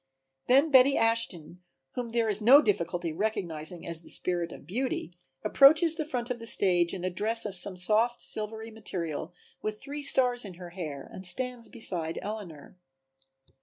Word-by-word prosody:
Then 275 +5 +4
Betty 270 +1 +6
Ashton, 190 -7 0 0.3
whom 245 -2 -5
there 230 -1 0
is 210 0 -1
no 255 +7 +8
difficulty 180 - -1
in 155 - -8
recognizing 175 -6 -3
as 165 -1 -4
the - - -16
spirit 175 -2 -3
of - - -12
Beauty, 220 -4 -3 0.3
approaches 310 +4 +6
the 315 -2 -4
front 250 -5 -3
of 240 - -3
the 230 - -4
stage 175 -5 +3
in 180 - -6
a 185 - -1
dress 220 +6 +1
of 205 -2 -4
some 185 +1 -2
soft 220 +6 +2
silvery 220 +1 -5
material 175 -7 -5 0.3
with 215 0 -4
three 290 +1 -7
stars 250 -3 +3
in 195 -4 -9
her 175 0 -10
hair 155 -7 -7
and 185 -1 -4
stands 250 +3 0
beside 175 -9 -1
Eleanor. 185 -6 -8
210 Hz, 170 wpm, -28 LUFS, 175-245 Hz, 0.3 s, no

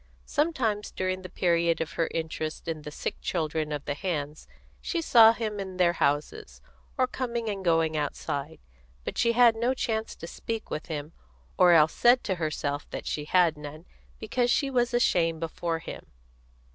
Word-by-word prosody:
Sometimes 260 -10 0
during 185 0 -2
the 185 - -9
period 170 -2 +1
of 160 - -3
her 165 - 0
interest 160 0 -4
in 160 -2 -3
the 150 - -7
sick 150 - -4
children 155 -2 -2
of 145 -1 -4
the 145 - -1
hands, 150 -3 -4 0.3
she 345 - -2
saw 230 -8 +7
him 220 -2 -3
in 190 -2 -6
their 175 -2 +4
houses, 155 - -1 0.4
or 260 - +4
coming 240 -3 -3
and 195 -2 -4
going 165 -2 +2
outside; 145 0 -3 0.5
but - - -5
she 235 - +2
had 235 -1 +6
no 240 +3 0
chance 220 -3 -2
to - - -9
speak 225 +6 -5
with 155 - -4
him, 150 -1 -5 0.4
or 180 -1 +6
else 160 -1 +5
said 245 +1 +4
to 195 - -1
herself 145 -2 -2
that - - -6
she 150 - -3
had 175 -1 +3
none, 150 +3 -9 0.3
because 240 +3 0
she 275 +2 +1
was 245 -2 +1
ashamed 170 -9 +2
before 165 0 -2
him. 160 - -9
175 Hz, 175 wpm, -27 LUFS, 155-225 Hz, 0.5 s, saw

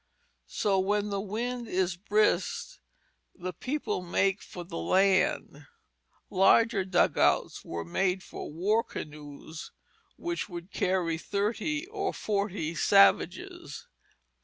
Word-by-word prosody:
So 195 -2 +1
when 205 +2 0
the 200 -1 -1
wind 235 +4 -3
is 185 -2 0
brisk 210 - 0 0.6
the 180 0 -5
people 255 - -3
make 190 +2 +1
for 175 - -8
the 170 - -6
land. 190 - +2 0.6
Larger 200 +2 +4
dugouts 185 -2 +2
were 85 0 -5
made 180 - 0
for - - -8
war 205 +8 +1
canoes 150 +1 -9 0.4
which 345 -9 -4
would 175 +1 -8
carry 175 -3 0
thirty 220 - -1
or 395 0 -3
forty 200 -6 -2
savages." 100 -10 +2
195 Hz, 110 wpm, -29 LUFS, 175-215 Hz, 0.6 s, Larger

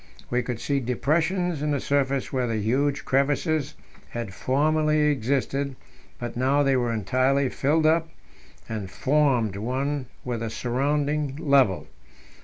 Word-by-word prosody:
We 125 +1 +2
could 120 -2 -4
see 140 -1 0
depressions 160 +7 0
in 150 - 0
the 145 -1 +1
surface 140 -1 0
where 130 -2 0
the 115 -1 -1
huge 135 +7 0
crevasses 145 +2 +1 0.3
had 115 -5 -5
formerly 155 +6 +1
existed, 140 +1 -1 0.4
but 120 -1 -6
now 135 +4 +2
they 135 -1 +3
were 120 -2 +1
entirely 130 +5 +1
filled 155 +5 +1
up, 165 +1 +3 0.6
and 105 -4 -4
formed 130 -6 +1
one 130 +5 -2 0.2
with 120 -2 -2
the 115 0 -3
surrounding 140 +5 -1
level. 140 - +3
135 Hz, 135 wpm, -25 LUFS, 120-145 Hz, 0.6 s, they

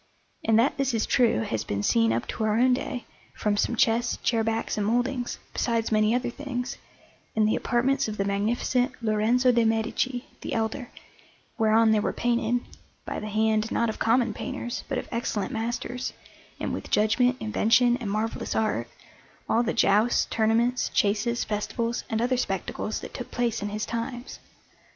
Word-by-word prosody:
And 225 -1 +3
that 240 +5 +3
this 270 -3 0
is 220 - +1
true 235 - +3
has 110 -1 -2
been 100 -2 -3
seen 115 +1 +3
up 115 +1 -1
to - - -3
our 215 0 +2
own 250 +2 +4
day 250 -1 -3 0.3
from 210 -1 0
some 235 - 0
chests, 230 +1 +2
chair 230 -2 +2
backs, 225 0 -1
and 205 -1 -1
mouldings, 245 +2 0 0.2
besides 230 -2 0
many 215 +1 +3
other 245 -1 -1
things, 265 -1 -4 0.6
in 215 -1 +3
the 215 - +2
apartments 270 +2 +1
of 215 -1 -5
the 195 - 0
Magnificent 235 +5 0
Lorenzo 225 +4 +3
de' 235 -1 +3
Medici, 230 +3 0 0.2
the - - -4
Elder, 225 +3 -2 0.7
whereon 220 0 +4
there 215 -1 +3
were - - -1
painted 240 0 +1 0.4
by - - -4
the 215 - -5
hand, 220 +1 +1
not 235 - +1
of 220 - -5
common 230 -1 +2
painters, 240 0 -5
but 270 - -1
of - - -4
excellent 230 -4 -2
masters, 240 +2 -3 0.5
and - - -2
with - - -5
judgment, 245 +4 +3
invention, 235 +3 +3
and 235 -6 -5
marvellous 215 +2 -2
art 210 - 0 0.6
all 230 - +3
the 235 - 0
jousts, 215 +1 +3
tournaments, 230 +3 +2
chases, 215 +4 +1
festivals, 230 +3 -2
and 225 +1 0
other 250 +1 +1
spectacles 250 - -2
that - - -9
took - - -6
place 240 -2 -1
in 205 - -2
his 210 +1 -3
times. 240 +2 -5
230 Hz, 175 wpm, -26 LUFS, 215-245 Hz, 0.7 s, own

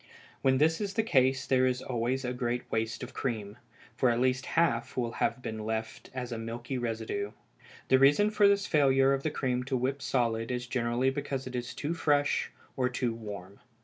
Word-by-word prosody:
When 130 -1 +3
this 160 +6 +3
is 200 -1 -3
the 225 - +2
case 135 - +2
there 130 -1 +3
is 125 -1 0
always 125 +2 -1
a 125 - -1
great 125 -1 -2
waste 115 +2 -1
of 125 - -8
cream, 110 -3 -3 0.4
for 130 - +3
at 120 0 +1
least 130 +1 +1
half 125 -8 +1
will 120 -2 0
have 125 - 0
been 110 -1 -4
left 110 0 -4
as 125 -2 -5
a 115 - -3
milky 120 +3 -5
residue. 110 -3 -3 0.6
The 130 - +6
reason 145 +10 +5
for 210 -1 +5
this 200 0 +3
failure 135 -3 +4
of 135 - 0
the 155 - 0
cream 130 -4 -1
to 135 -1 0
whip 135 +3 -1
solid 115 -4 0
is 125 -1 -2
generally 125 +1 0
because 135 -1 -3
it 130 -1 -6
is 125 0 -4
too 150 +5 -2
fresh 145 -3 +1 0.3
or 125 -2 +1
too 125 -2 -1
warm. 100 -4 -8
125 Hz, 200 wpm, -30 LUFS, 115-135 Hz, 0.6 s, The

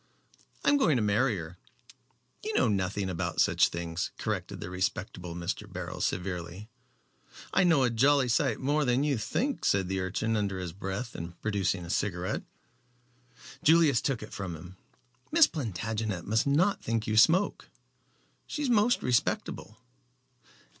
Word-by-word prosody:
I'm 285 - +5
going 175 - +3
to 120 - +1
marry 105 +2 +2
her." 85 +1 -8 0.8
"You 430 0 -3
know - - +4
nothing 100 -1 -1
about 90 -3 -3
such - - +4
things," 85 0 -3
corrected - - -3
the 90 - -6
respectable 90 -2 -3
Mr. 85 0 -4
Beryl, - - -6
severely. 90 +2 -3 0.8
"I 195 - +4
know 160 -6 +4
a 125 - +2
jolly 135 +3 +3
sight 120 - +1
more 145 +3 +1
than 125 +1 +2
you 140 -5 +1
think," 265 - -2
said 95 -2 +2
the 95 0 -1
urchin 105 +5 -1
under 100 -3 -1
his 90 -3 -5
breath 100 +6 -5
and 85 +1 -8
producing 100 -4 0
a 85 - -5
cigarette. 90 -3 -1 1.2
Julius 155 -6 +5
took 130 -6 -1
it 110 - -10
from 95 -4 -5
him. 90 +3 -11 0.6
"Miss 330 -1 +7
Plantagenet 110 - -3
must 110 +5 +1
not 175 +8 +2
think 115 -1 -1
you 110 - -1
smoke, 165 - +4
Jerry. - - -31 0.8
She 300 - -4
is 275 - 0
most 230 +2 +3
respectable." 115 -3 -1
110 Hz, 155 wpm, -29 LUFS, 90-140 Hz, 1.2 s, Miss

